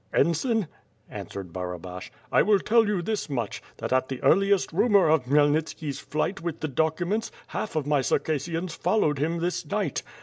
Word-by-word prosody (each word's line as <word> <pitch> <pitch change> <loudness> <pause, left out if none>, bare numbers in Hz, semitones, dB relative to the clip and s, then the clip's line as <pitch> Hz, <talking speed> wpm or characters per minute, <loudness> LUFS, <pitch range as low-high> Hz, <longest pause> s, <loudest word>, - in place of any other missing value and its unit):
*' - - -32
"Ensign," 215 - +2 0.4
answered 95 -4 -7
Barabash, 90 0 -6 0.2
"I - - +5
will 210 -1 +4
tell 225 +3 +3
you 200 -4 0
this 215 -3 -2
much, 120 -7 -3 0.2
that - - -3
at 130 0 +1
the 130 -2 -4
earliest 195 -1 +3
rumor 200 -1 +4
of 155 -4 +3
Khmyelnitski's 145 +1 +1
flight 165 +6 -2
with 165 -2 -4
tlic 155 -4 -4
documents, 170 - 0 0.2
half 210 - -4
of 155 -3 0
my 145 -1 +2
Circassians 165 +5 -1
followed 165 -6 +1
him 165 +4 0
this 175 +1 -1
niglit. 200 -8 -2
160 Hz, 170 wpm, -26 LUFS, 140-195 Hz, 0.4 s, I